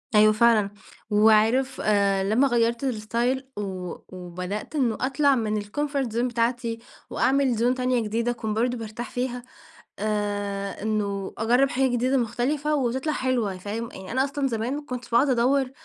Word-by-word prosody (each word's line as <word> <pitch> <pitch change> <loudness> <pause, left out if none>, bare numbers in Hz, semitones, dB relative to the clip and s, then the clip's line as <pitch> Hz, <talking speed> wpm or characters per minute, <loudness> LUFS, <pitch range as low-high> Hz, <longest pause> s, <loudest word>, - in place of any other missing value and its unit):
أيوه 215 0 +7
فعلًا. 215 -2 +4 0.4
وعارف، 220 +5 +3
آآ 200 -2 +2
لما 220 +8 +3
غيرت 235 0 +1
الستايل 245 +2 -1
و 185 -3 -4 0.2
وبدأت 180 - -6
إنه 245 -7 +1
أطلع 275 +2 +3
من 215 -3 -1
الكومفورت 275 +4 -2
زون 235 +3 0
بتاعتي 235 -1 -1 0.3
وأعمل 270 -1 +2
زون 240 +3 +2
تانية 255 -1 +1
جديدة 230 +3 -1
أكون 225 -3 -3
برضه 245 +3 0
بارتاح 225 +1 -6
فيها، 250 0 -3 0.6
آآ، 205 -2 -2
إنه 200 -3 -2
أجرب 245 +5 +3
حاجة 265 +1 +2
جديدة 250 +2 +1
مختلفة 265 +6 0
وتطلع 265 +3 0
حلوة، 240 -8 -1
فاهم؟ 215 +5 -5
يعني 190 -1 -9
أنا 260 +2 +2
أصلًا 275 0 -1
زمان 230 +2 -2
ما 295 - -4
كنتش 250 -3 -6
باقعد 240 +5 +3
أدور 260 +2 +2
235 Hz, 150 wpm, -25 LUFS, 210-260 Hz, 0.6 s, أيوه